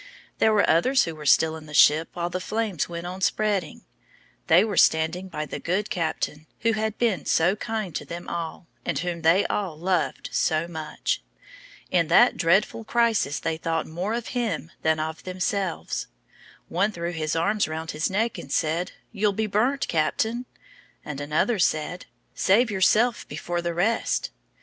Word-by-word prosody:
There 220 Hz, -, +4 dB
were 210 Hz, -2 st, +3 dB
others 255 Hz, +12 st, +4 dB
who 165 Hz, -, -3 dB
were 150 Hz, -1 st, -7 dB
still 160 Hz, +2 st, +4 dB
in 155 Hz, -1 st, -10 dB
the 150 Hz, -, -7 dB
ship 155 Hz, +3 st, +6 dB
while 175 Hz, 0 st, -3 dB
the 185 Hz, -, -2 dB
flames 210 Hz, -4 st, -2 dB
went 170 Hz, 0 st, -5 dB
on 185 Hz, +2 st, -6 dB
spreading. 200 Hz, -4 st, 0 dB, 0.6 s
They 175 Hz, +4 st, +6 dB
were 215 Hz, -2 st, -2 dB
standing 160 Hz, +4 st, +3 dB
by 155 Hz, -4 st, -4 dB
the -, -, -6 dB
good 190 Hz, +5 st, -1 dB
captain, 160 Hz, -2 st, -2 dB
who 230 Hz, -, +3 dB
had 220 Hz, 0 st, -2 dB
been 215 Hz, -10 st, 0 dB
so 175 Hz, +4 st, +3 dB
kind 215 Hz, -5 st, -4 dB
to -, -, -3 dB
them 170 Hz, +1 st, -8 dB
all, 170 Hz, +1 st, -5 dB, 0.2 s
and -, -, -2 dB
whom 170 Hz, 0 st, -3 dB
they 170 Hz, +5 st, +4 dB
all 190 Hz, -7 st, -2 dB
loved 180 Hz, +1 st, -1 dB
so 160 Hz, +1 st, +1 dB
much. 160 Hz, -, -3 dB, 0.7 s
In 170 Hz, -3 st, +3 dB
that 240 Hz, +9 st, +5 dB
dreadful 195 Hz, +6 st, +2 dB
crisis 225 Hz, -, +1 dB
they 160 Hz, -1 st, -2 dB
thought 165 Hz, 0 st, -1 dB
more 180 Hz, +8 st, -3 dB
of 235 Hz, -1 st, -4 dB
him 220 Hz, -10 st, -2 dB
than 160 Hz, 0 st, +2 dB
of 160 Hz, +1 st, -4 dB
themselves. 185 Hz, 0 st, -2 dB, 0.6 s
One 200 Hz, +5 st, +1 dB
threw 170 Hz, -3 st, -4 dB
his 155 Hz, -2 st, -2 dB
arms 200 Hz, +6 st, +1 dB
round 160 Hz, +1 st, -4 dB
his 155 Hz, +1 st, -1 dB
neck 220 Hz, +4 st, -1 dB
and -, -, -9 dB
said: 165 Hz, +2 st, 0 dB, 0.2 s
"You'll 210 Hz, -2 st, +1 dB
be 220 Hz, +2 st, -1 dB
burnt, 245 Hz, +7 st, +1 dB
Captain;" 220 Hz, +10 st, 0 dB, 0.6 s
and 145 Hz, -1 st, -5 dB
another 155 Hz, +10 st, +1 dB
said: 175 Hz, +1 st, 0 dB, 0.3 s
"Save 225 Hz, +4 st, +3 dB
yourself 215 Hz, +5 st, +2 dB
before 175 Hz, +3 st, -3 dB
the 170 Hz, -1 st, -3 dB
rest." 220 Hz, +6 st, 0 dB
175 Hz, 170 wpm, -25 LUFS, 160-215 Hz, 0.7 s, ship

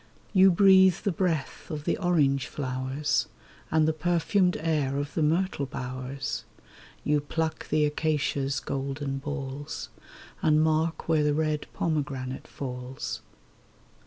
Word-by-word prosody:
You 190 Hz, -1 st, +7 dB
breathe 190 Hz, 0 st, +6 dB
the 200 Hz, -, +1 dB
breath 165 Hz, -5 st, -2 dB
of 150 Hz, -3 st, -4 dB
the -, -, +1 dB
orange 145 Hz, -7 st, +2 dB
flowers, 130 Hz, +1 st, -1 dB, 0.4 s
And 155 Hz, -1 st, +3 dB
the 160 Hz, -, +2 dB
perfumed 175 Hz, +3 st, +2 dB
air 150 Hz, -4 st, 0 dB
of 145 Hz, +1 st, -3 dB
the 160 Hz, -, 0 dB
myrtle 160 Hz, -1 st, +1 dB
bowers; 130 Hz, +1 st, -4 dB, 0.6 s
You 150 Hz, 0 st, +2 dB
pluck 160 Hz, +2 st, -3 dB
the 150 Hz, 0 st, +3 dB
acacia's 145 Hz, -2 st, 0 dB
golden 135 Hz, 0 st, -3 dB
balls, 145 Hz, 0 st, -5 dB, 0.5 s
And 155 Hz, 0 st, +4 dB
mark 160 Hz, +1 st, +1 dB
where 160 Hz, -2 st, +3 dB
the 150 Hz, 0 st, +2 dB
red 155 Hz, -1 st, 0 dB
pomegranate 140 Hz, -5 st, -2 dB
falls. 125 Hz, -1 st, -5 dB
150 Hz, 125 wpm, -27 LUFS, 135-160 Hz, 0.6 s, You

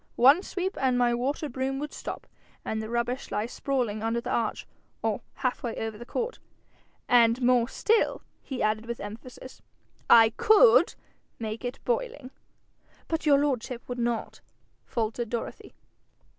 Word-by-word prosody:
One 275 Hz, +8 st, +6 dB
sweep, 380 Hz, -1 st, -3 dB
and 255 Hz, -2 st, +2 dB
my 240 Hz, -1 st, +3 dB
water 270 Hz, +6 st, -1 dB
broom 265 Hz, 0 st, -2 dB
would 295 Hz, +2 st, -5 dB
stop, -, -, -6 dB, 0.4 s
and 220 Hz, 0 st, -2 dB
the 220 Hz, -, -6 dB
rubbish 240 Hz, +2 st, -2 dB
lie 210 Hz, +1 st, -1 dB
sprawling 240 Hz, -4 st, -2 dB
under 225 Hz, +1 st, 0 dB
the -, -, -5 dB
arch, 225 Hz, -2 st, -1 dB, 0.4 s
or -, -, 0 dB
half 255 Hz, -2 st, -2 dB
way 235 Hz, -2 st, -3 dB
over 225 Hz, -1 st, -4 dB
the 240 Hz, +3 st, -10 dB
court. 485 Hz, +1 st, -3 dB, 0.7 s
And 235 Hz, 0 st, +5 dB
more 245 Hz, -1 st, +4 dB
still,' 445 Hz, +9 st, +1 dB, 0.2 s
he 265 Hz, -3 st, -4 dB
added 215 Hz, +1 st, 0 dB
with 235 Hz, 0 st, -4 dB
emphasis: 235 Hz, +5 st, -9 dB, 0.5 s
'I 225 Hz, -1 st, +8 dB
COULD 460 Hz, +2 st, +6 dB, 0.4 s
make 220 Hz, 0 st, -5 dB
it 245 Hz, +2 st, -4 dB
boiling!' 480 Hz, -, -2 dB, 0.8 s
'But 325 Hz, -1 st, -2 dB
your 285 Hz, -1 st, +7 dB
lordship 255 Hz, -4 st, -2 dB
would 245 Hz, 0 st, -5 dB
not?' 235 Hz, -1 st, -2 dB, 0.5 s
faltered 230 Hz, 0 st, -2 dB
Dorothy. 235 Hz, 0 st, -5 dB
245 Hz, 150 wpm, -27 LUFS, 230-275 Hz, 0.8 s, I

